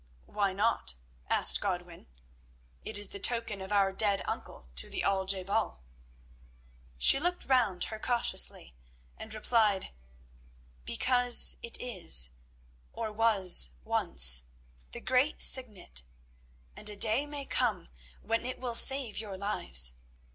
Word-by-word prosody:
"Why 200 -2 -3
not?" 195 - 0 0.3
asked - - +4
Godwin. 180 -4 -7 0.8
"It - - -5
is 205 -1 0
the 200 - -9
token 230 -2 -2
of 190 +1 -10
our 195 -2 0
dead 200 0 0
uncle - - -9
to - - -5
the - - -6
Al 195 -1 -2
je 190 -1 +1
bal." 65 - -4 1.1
She 165 - +6
looked 355 +3 -3
round 240 -9 0
her 220 - -6
cautiously 235 - 0 0.4
and 220 - -12
replied: 215 -2 -1 0.9
"Because 245 - +2
it 235 - -3
is, 60 - +4 0.6
or 220 -2 -7
was 195 - +4
once, 60 0 +2 0.5
the - - -10
great 260 +4 -2
Signet, 210 - +2 0.7
and 210 - -5
a 205 - -10
day 225 +7 +2
may 290 -1 -9
come 220 -11 -3 0.4
when 225 +2 -3
it 255 +1 -7
will 250 -2 -5
save 265 -2 +4
your 205 -3 -8
lives. 65 - -1
210 Hz, 130 wpm, -28 LUFS, 185-235 Hz, 1.1 s, She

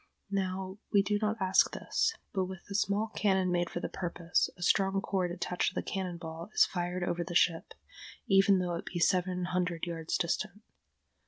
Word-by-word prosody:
Now 190 0 -2
we 200 -2 +5
do 205 +1 0
not 215 +1 0
ask 190 -1 +4
this; 450 - 0 0.2
but 190 -2 +1
with 185 0 -7
a - - -2
small 205 +2 +1
cannon 190 -3 +2
made 175 -1 +1
for - - -4
the - - -3
purpose, 175 -1 -1
a 175 - -6
strong 195 +2 +3
cord 190 -2 -1
attached 180 +1 -1
to - - 0
a - - -4
cannon 185 -3 -3
ball 165 +2 -7
is - - +7
fired 180 0 -3
over 175 0 -1
the 175 0 -6
ship, 165 0 +2 0.5
even 195 0 +5
though 180 -1 -1
it 170 - -4
be 175 - -4
several 180 +1 +2
hundred 180 -1 -1
yards 165 -2 -2
distant. 205 +4 -2
185 Hz, 190 wpm, -31 LUFS, 175-195 Hz, 0.5 s, is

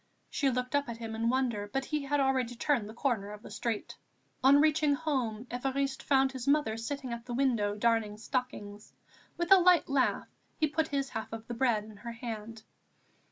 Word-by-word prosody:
She 280 - +1
looked 250 +1 -1
up 285 -3 +1
at 235 - -5
him 225 -1 -6
in 225 +1 0
wonder; 235 -5 0
but 270 0 -1
he 300 +1 -1
had 290 +1 +1
already 260 -3 +1
turned 235 -4 0
the - - -8
corner 230 -6 -1
of 210 +1 -10
the - - -10
street. 230 -3 -3 0.5
On 275 +2 +7
reaching 305 -1 +3
home, 255 -8 -2
Évariste 270 +2 -1
found 270 -1 +3
his 260 -1 -6
mother 280 -6 +3
sitting 255 +2 -4
at 235 0 -7
the 240 - -3
window 235 -6 +1
darning 220 -1 +1
stockings. 215 -3 -4 0.4
With 345 +2 -2
a 390 - +11
light 360 -2 +5
laugh 275 -2 +1 0.3
he 310 - +3
put 310 +1 0
his 275 -2 -1
half 220 - -5
of 225 0 -6
the 240 - -5
bread 235 -3 +1
in 215 -1 -12
her 235 +2 -7
hand. 225 -1 -7
250 Hz, 200 wpm, -31 LUFS, 225-275 Hz, 0.5 s, a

